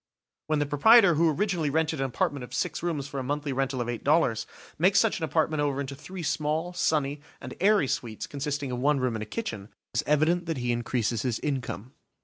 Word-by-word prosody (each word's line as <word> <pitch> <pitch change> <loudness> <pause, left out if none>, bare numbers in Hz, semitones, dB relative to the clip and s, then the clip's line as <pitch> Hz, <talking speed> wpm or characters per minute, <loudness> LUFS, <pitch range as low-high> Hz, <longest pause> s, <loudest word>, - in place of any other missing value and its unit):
When 155 -1 +1
the 145 - +1
proprietor 185 +7 +6
who 165 +1 +3
originally 170 -2 0
rented 160 +1 0
an 135 - 0
apartment 130 +1 -1
of 125 0 -8
six 155 +1 -2
rooms 160 -5 -2
for 140 -1 -5
a - - -3
monthly 145 +1 -2
rental 135 -1 -1
of 120 - -3
eight 120 -2 -4
dollars, 125 -7 +2 0.3
makes 190 +4 +4
such 220 -3 +3
an 165 - -1
apartment 155 -1 0
over 140 -2 0
into 140 -1 -4
three 180 +5 -8
small, 155 +3 -1
sunny, 145 -4 0 0.2
and - - -8
airy 200 -6 +4
suites 115 -4 -3
consisting 145 -1 -3
of 125 - -3
one 145 +2 +2
room 130 -3 0
and 110 - -4
a 110 - -5
kitchen, 110 - -4 0.3
it - - -3
is - - +1
evident 160 +4 +2
that 165 -3 -2
he 125 -1 -1
increases 120 -2 -1
his 125 -4 -1
income. 130 -4 -4
145 Hz, 220 wpm, -27 LUFS, 130-160 Hz, 0.3 s, proprietor